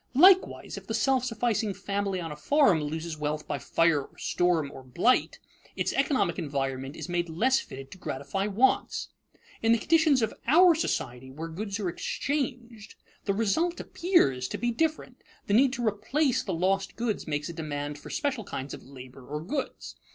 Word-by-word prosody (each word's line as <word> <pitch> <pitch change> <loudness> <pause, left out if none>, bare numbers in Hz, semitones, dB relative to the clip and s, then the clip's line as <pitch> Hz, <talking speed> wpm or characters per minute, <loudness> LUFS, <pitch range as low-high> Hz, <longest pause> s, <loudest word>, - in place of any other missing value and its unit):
Likewise, 375 +6 +5
if - - -22
the 220 - -2
self 260 +2 +2
sufficing 230 -4 0
family 200 -1 -2
on 165 -2 -5
a - - -5
farm 200 - +3
loses 160 +1 -4
wealth 150 0 -2
by - - -2
fire 165 -3 +2
or - - -22
storm 170 -5 +1
or 135 - -9
blight, 180 - +1 0.4
its - - -1
economic 260 - +1
environment 135 -1 -3
is - - -6
made 175 -1 -1
less 255 +12 +2
fitted 135 0 -9
to 185 - -11
gratify 140 +10 -3
wants. 225 +6 +1 0.5
In 225 0 +4
the - - +4
conditions 310 -1 +3
of 220 - -1
our 345 +6 +7
society, 130 - -2
where 160 +5 -6
goods 200 +5 -4
are 200 - -1
exchanged, 240 - -3 0.3
the 200 - +1
result 275 - +1
appears 135 - +2
to - - -4
be 240 0 0
different. 310 +6 -2 0.2
The 200 - -1
need 255 +4 +5
to 245 -3 -2
replace 250 +7 +1
the 195 - -4
lost 190 +3 0
goods 230 -6 -2
makes 150 -1 -2
a - - -5
demand 145 -2 -4
for - - -11
special 275 -6 -1
kinds 135 -7 -6
of - - -8
labor 130 0 -12
or 150 +4 -5
goods. 270 - -4
195 Hz, 180 wpm, -28 LUFS, 150-255 Hz, 0.5 s, our